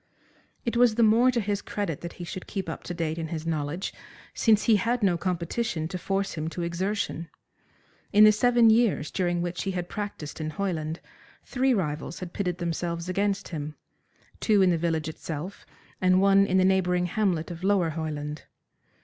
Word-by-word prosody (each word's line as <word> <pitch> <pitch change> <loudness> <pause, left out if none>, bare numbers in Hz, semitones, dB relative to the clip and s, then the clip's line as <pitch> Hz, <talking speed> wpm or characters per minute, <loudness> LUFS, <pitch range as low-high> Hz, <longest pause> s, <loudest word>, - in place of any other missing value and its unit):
It 235 - -1
was 235 -2 +4
the 235 - +3
more 225 +4 +5
to 245 -2 +1
his 205 -1 -1
credit 200 -8 -3
that 170 - -6
he 175 - -8
should 180 +2 -7
keep 195 -2 -4
up - - -5
to 175 - -4
date 165 -1 -2
in 160 - -3
his 160 0 -5
knowledge, 160 +2 -2 0.4
since 215 -3 +3
he 220 -2 +5
had 235 +3 0
no 185 -3 +4
competition 170 0 -2
to 185 - -4
force 195 +2 -1
him 155 -1 -3
to 170 +1 -4
exertion. 170 -1 -2 0.8
In 210 +1 +7
the 215 - +9
seven 235 +1 +5
years 220 -9 +2
during 175 -2 0
which 175 0 -3
he 195 - -2
had 175 -1 -3
practised 200 -8 -5
in 155 - -2
Hoyland 160 -3 -3 0.4
three 265 0 +1
rivals 155 -4 -3
had 180 -2 -7
pitted 180 -3 -2
themselves 170 0 -3
against 200 +1 0
him, 150 -2 -5 0.6
two 210 -3 +4
in 185 - +4
the - - +3
village 160 -2 -1
itself 160 +3 -6 0.3
and 185 0 +4
one 195 0 +5
in 185 - +2
the 185 - +4
neighbouring 180 -2 +2
hamlet 180 -3 0
of 170 +1 -8
Lower 190 -4 +2
Hoyland. 150 -2 -4
180 Hz, 185 wpm, -27 LUFS, 165-205 Hz, 0.8 s, the